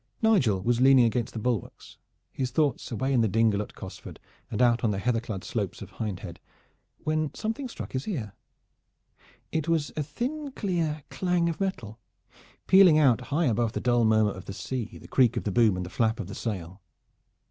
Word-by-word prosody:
Nigel 130 - +3
was 120 +2 +1
leaning 130 -2 +7
against 115 0 -1
the - - -6
bulwarks, 115 -2 -4 0.3
his 130 -2 -2
thoughts 145 +1 0
away 130 +4 -1
in 125 - +4
the 110 - +3
dingle 110 0 +2
at 105 - -8
Cosford - - -9 0.3
and - - -4
out 120 -1 +3
on 115 - +3
the 100 - -1
heather 115 +3 +1
clad 105 -6 -6
slopes - - -3
of - - -9
Hindhead, 105 -5 -5 0.6
when 155 -2 0
something 225 +5 -3
struck - - -8
his 130 0 -3
ear. 120 - -4 1.2
It 160 -1 -1
was 160 -3 0
a 155 - -1
thin 265 - -4
clear 165 - -2
clang 180 -2 +1
of 165 - -4
metal, 120 - -3 0.7
pealing 185 -5 +7
out 130 -8 +4
high 155 +4 +1
above 115 -2 +1
the - - -2
dull 120 -1 +2
murmur 110 -1 +3
of 95 - -9
the 95 - -6
sea, 115 -3 -5
the 80 +1 -13
creak 125 +1 +3
of - - -2
the 105 - -1
boom 110 -2 +3
and 90 - -3
the 90 - -9
flap 115 +3 +1
of 115 - -3
the 100 - -8
sail. 95 -4 -5
120 Hz, 195 wpm, -27 LUFS, 110-155 Hz, 1.2 s, leaning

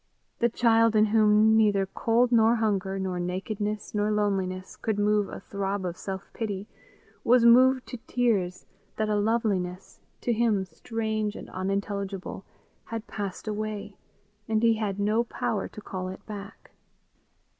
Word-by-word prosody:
The 235 - +3
child 230 -1 +3
in 215 0 +6
whom 215 0 +5
neither 205 -3 +4
cold 235 +5 +1
nor 230 0 +5
hunger 195 -4 0
nor 185 -2 -2
nakedness 205 +4 -3
nor 210 0 +1
loneliness 195 -3 -1
could 220 -2 -2
move 205 0 +2
a - - -8
throb 195 -1 -3
of 175 -1 -3
self 190 0 -6
pity, 205 -3 -4 0.6
was 240 0 +5
moved 255 +2 +6
to 250 - -5
tears 200 -8 0 0.3
that 215 -1 -1
a 210 - +2
loveliness, 205 -4 -1 0.2
to 240 - +1
him 220 -4 +2
strange 220 +1 -3
and - - -9
unintelligible, 195 0 -3 0.4
had 225 -1 -5
passed 200 -1 -5
away, 210 -1 -4 0.5
and 220 0 +1
he 230 -1 +5
had 210 -3 -2
no 215 +3 +2
power 220 -3 -2
to 215 - -11
call 185 -2 -5
it 185 +1 -8
back. 205 -1 -9
210 Hz, 145 wpm, -27 LUFS, 195-225 Hz, 0.6 s, in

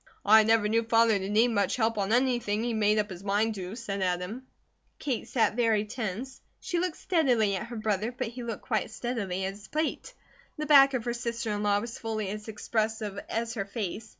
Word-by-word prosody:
"I 220 +2 +8
never 220 -1 +3
knew 225 +2 +2
Father 225 -2 +3
to 190 +1 -4
need 220 +4 +4
much 205 -3 +1
help 225 -2 0
on 200 +1 -1
anything 240 -4 +1
he 240 -1 -1
made 210 -1 +2
up 210 -1 0
his 185 +1 -8
mind 210 +3 +1
to," 190 0 -6
said 205 -5 -4
Adam. 185 +8 -2 0.5
Kate 265 -6 -3
sat 225 -3 +1
very 225 -3 +2
tense. 225 +3 -5 0.2
She 350 -2 -2
looked 360 -2 -2
steadily 245 - +2
at 215 +5 -4
her 240 - -7
brother, 215 0 -1
but 250 -1 -4
he 245 +2 -8
looked 230 -2 -5
quite 220 -4 0
as 220 - -11
steadily 205 -6 -2
at 190 - -3
his 205 +1 -13
plate. 310 +1 -3 0.4
The 305 - -3
back 275 -2 +7
of 240 -2 -2
her 240 - -1
sister 235 -2 -3
in 205 0 -2
law 205 -1 +2
was 235 +2 -7
fully 215 -3 -3
as 210 +2 -6
expressive 220 -1 -2
as 230 0 -2
her 200 -4 -3
face. 215 +1 -5
220 Hz, 215 wpm, -28 LUFS, 205-240 Hz, 0.5 s, I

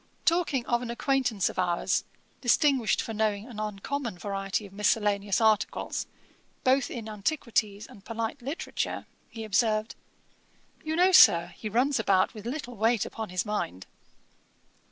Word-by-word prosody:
Talking 330 -7 +2
of 240 0 +1
an 245 - -5
acquaintance 240 -4 0
of - - -4
ours, 175 -2 +1 0.4
distinguished 260 -2 +3
for 225 - -5
knowing 215 -1 0
an 230 -4 -9
uncommon 215 +2 -4
variety 195 +2 -3
of 195 - -13
miscellaneous 205 -1 +1
articles 220 -2 +1 0.6
both 265 +1 +3
in 225 -2 -6
antiquities 215 -2 -1
and 200 - -15
polite 230 +1 -4
literature, 280 +7 -4 0.2
he 225 - -7
observed, 215 +1 +1 0.9
'You 315 0 -2
know, 365 +3 +4
Sir, 170 - +7
he 215 - -5
runs 250 +5 +2
about 195 -3 +2
with 215 0 -8
little 245 -1 -5
weight 225 +1 +2
upon 220 -3 -6
his 185 +2 -2
mind.' 95 - -3
220 Hz, 140 wpm, -28 LUFS, 200-245 Hz, 0.9 s, Sir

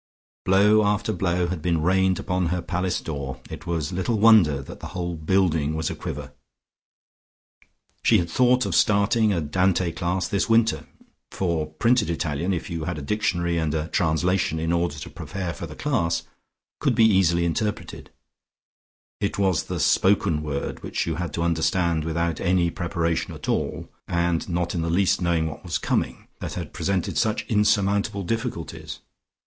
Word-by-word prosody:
Blow 105 +3 +5
after 105 +1 0
blow 90 -3 0
had 90 -3 -3
been 85 0 +1
rained 95 +1 +3
upon 90 -1 -1
her 90 +1 -2
palace 90 0 -1
door, 70 -4 -5
it - - -8
was 85 -1 -2
little 95 +6 0
wonder 100 -10 +6
that 70 - -9
the - - -7
whole 85 -1 -2
building 80 -2 +1
was 80 0 -1
a - - -5
quiver. - - -6 1.7
She - - +4
had 85 - 0
thought 125 +7 +3
of - - -2
starting 105 +1 +3
a 90 - +1
Dante 90 +3 +1
class 90 +1 -1
this 100 +3 -1
winter, 115 0 +2 0.4
for 85 -5 -1
printed 105 +8 +1
Italian, 85 +1 -1
if 85 -3 -2
you 80 -2 -4
had 90 -1 -3
a - - -5
dictionary 85 -2 0
and 80 -1 -1
a 80 +1 -2
translation 80 +1 +1
in 80 +1 -1
order 85 -3 0
to 75 - -7
prepare 90 -4 -5
for 85 - -7
the 75 - -10
class, 85 - 0 0.6
could - - +1
be 115 - +5
easily 90 -5 +3
interpreted: 105 +5 -3 1.1
it 100 - -2
was 95 -4 +1
the - - -4
spoken 95 -5 +3
word 70 -2 -4
which - - -2
you 80 -1 -2
had 90 -3 -3
to 85 - -1
understand 85 -1 +1
without 85 0 -1
any 90 -2 +2
preparation 85 -1 -2
at - - -9
all, - - -1 0.2
and 85 0 0
not 85 0 -1
in 85 - -1
the 85 - -1
least 95 +3 +2
knowing 85 -2 +1
what 80 - -6
was 85 -3 -2
coming, - - -2
that - - -5
had - - -6
presented 95 -3 -1
such 110 0 0
insurmountable 100 -2 +1
difficulties. 115 -3 -4
85 Hz, 170 wpm, -24 LUFS, 80-100 Hz, 1.7 s, wonder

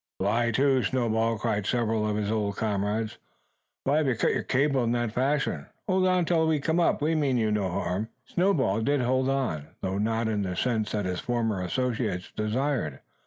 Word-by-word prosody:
"Lie 120 0 +1
to, 135 +2 +3
Snowball!" 115 -1 +1
cried 105 -1 -1
several 110 -3 +1
of 105 - -1
his 105 0 -1
old 105 -2 -1
comrades. 105 +1 -1 0.6
"Why 140 +3 +2
have 155 -2 +2
you 130 - +2
cut - - +1
your - - 0
cable 135 -1 +1
in 115 0 +1
that 120 -2 0
fashion? 135 +4 0 0.2
Hold 185 -1 +2
on 180 -1 +2
till 165 -1 +2
we 155 -2 +2
come 160 +4 0
up. 165 -3 +2
We 160 +2 +2
mean 140 -5 +1
you 110 -2 +1
no 105 -3 0
harm!" 90 +4 -2 0.2
Snowball 135 - +1
did 140 +4 +1
hold 130 +2 +1
on; 125 - -1
though 95 +1 -2
not 110 +1 0
in 105 -2 0
the 90 -2 -2
sense 110 +1 0
that 105 -2 -1
his 90 -1 -2
former 115 -5 -1
associates 110 -2 -2
desired. 110 - -1
115 Hz, 195 wpm, -27 LUFS, 105-135 Hz, 0.6 s, to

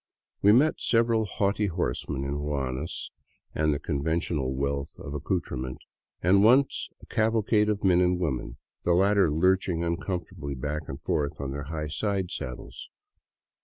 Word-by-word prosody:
We 100 - +6
met 135 +8 +4
several 115 -1 +2
haughty 100 +1 0
horsemen 80 -6 -2
in 70 - -3
ruanas 70 0 -3 0.4
and 75 0 +2
the 70 - +1
conventional 75 -1 -1
wealth 70 +1 -2
of 70 - -7
accoutrement, 70 -5 -3 0.5
and 100 +3 +5
once 130 +5 +4
a - - -10
cavalcade 110 -1 +2
of 105 -1 -1
men 90 -2 +5
and 90 0 +2
women, 65 -9 -2 0.3
the 85 - +3
latter 95 0 +4
lurching 90 +2 +2
uncomfortably 85 -4 -3
back 75 +3 -4
and 65 - -5
forth 75 -1 -1
on 70 -1 -3
their 70 +1 -5
high 75 +1 -4
side 95 +4 -2
saddles. 65 0 -7
85 Hz, 145 wpm, -27 LUFS, 70-100 Hz, 0.5 s, We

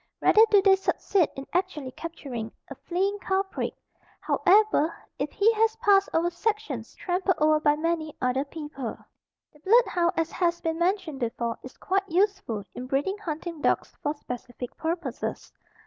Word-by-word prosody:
Rarely 440 +1 +6
do 405 -2 +5
they 390 -1 +7
succeed 385 -2 +1
in 270 - -6
actually 345 -8 -1
capturing 260 -8 -6 0.2
a - - -2
fleeing 390 +4 -1
culprit, 385 0 -2 0.4
however, 400 -5 +3 0.3
if - - -2
he 435 +2 +3
has 445 0 +2
passed 400 -3 +4
over 340 +2 +1
sections 345 - -3
trampled 370 0 0
over 310 0 +4
by 295 -1 +3
many 315 -1 -2
other 255 +2 +1
people. 290 -4 -6 0.6
The 300 - -20
blood 460 +10 +5
hound, 345 -1 +1
as 330 0 0
has 345 -1 0
been 325 -1 -2
mentioned 355 -5 0
before, 235 -1 -2
is 255 - -11
quite 390 +1 -1
useful 370 - 0
in 250 - -6
breeding 290 +10 -1
hunting 330 -3 -5
dogs - - 0
for 295 +1 -1
specific 245 -2 -7
purposes. 325 -5 -4
335 Hz, 155 wpm, -27 LUFS, 290-390 Hz, 0.6 s, they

